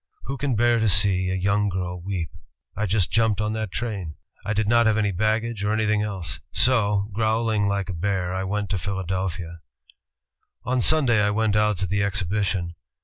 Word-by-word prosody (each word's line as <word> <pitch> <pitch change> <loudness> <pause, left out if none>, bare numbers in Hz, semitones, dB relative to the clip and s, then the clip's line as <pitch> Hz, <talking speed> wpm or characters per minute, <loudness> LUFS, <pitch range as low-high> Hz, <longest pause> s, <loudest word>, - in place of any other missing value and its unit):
Who 135 - -4
can 135 -2 -1
bear 120 +1 +3
to 110 -1 +2
see 95 -1 +3
a 95 - -1
young 100 +2 +1
girl 90 -1 -4
weep? 90 -3 -4 0.4
I 105 +2 -1
just 95 -1 +1
jimiped 110 -3 +2
on 105 0 -1
that 110 -3 -3
train. 100 -6 -4 0.3
I 100 - -1
did 105 0 0
not 115 +1 +4
have 110 -1 +2
any 105 -2 +1
baggage 110 +3 -1
or 105 - +1
anything 105 -1 +1
else. 95 -3 -3
So, 105 -5 +2
growling 110 -1 +1
like 100 -1 -1
a - - -3
bear, 90 0 -1
I 95 0 -2
went 100 +2 -2
to 95 - 0
Philadelphia 95 -3 -3 1.0
"On 125 +1 0
Sunday 130 -7 +4
I 105 - +2
went 105 0 +1
out 105 -1 +2
to 95 - -1
the 100 +3 0
exhibition. 100 -3 -1
105 Hz, 190 wpm, -24 LUFS, 95-110 Hz, 1.0 s, not